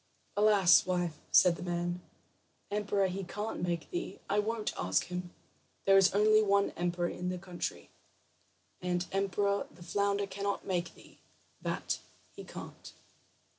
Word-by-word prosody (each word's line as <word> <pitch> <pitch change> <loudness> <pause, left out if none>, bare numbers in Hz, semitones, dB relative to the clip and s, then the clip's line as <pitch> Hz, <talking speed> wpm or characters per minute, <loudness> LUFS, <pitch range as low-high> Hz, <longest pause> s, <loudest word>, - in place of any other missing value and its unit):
"Alas, 205 -5 +6
wife," 175 -4 -1
said 175 -2 +6
the - - -9
man, 175 0 -2 0.7
"emperor 205 -1 +1
he 190 +1 -2
can't 210 +4 -4
make 175 -2 -2
thee, 350 0 -3
and - - -18 0.2
I - - +4
won't 220 +1 -1
ask 95 0 +1
him. 180 0 -5 0.6
There 195 - +6
is 195 0 +6
only 215 +1 +5
one 200 -1 +3
emperor 175 0 -1
in 180 0 -4
the 180 - -2
country; 180 -1 -5 0.9
and 180 0 0
emperor 200 +1 0
the 175 +3 -14
flounder 200 +3 0
cannot 200 +1 -3
make 175 -2 -2
thee, - - -18 0.4
that - - -2 0.3
he - - -10
can't." - - -10
190 Hz, 145 wpm, -32 LUFS, 175-200 Hz, 0.9 s, Alas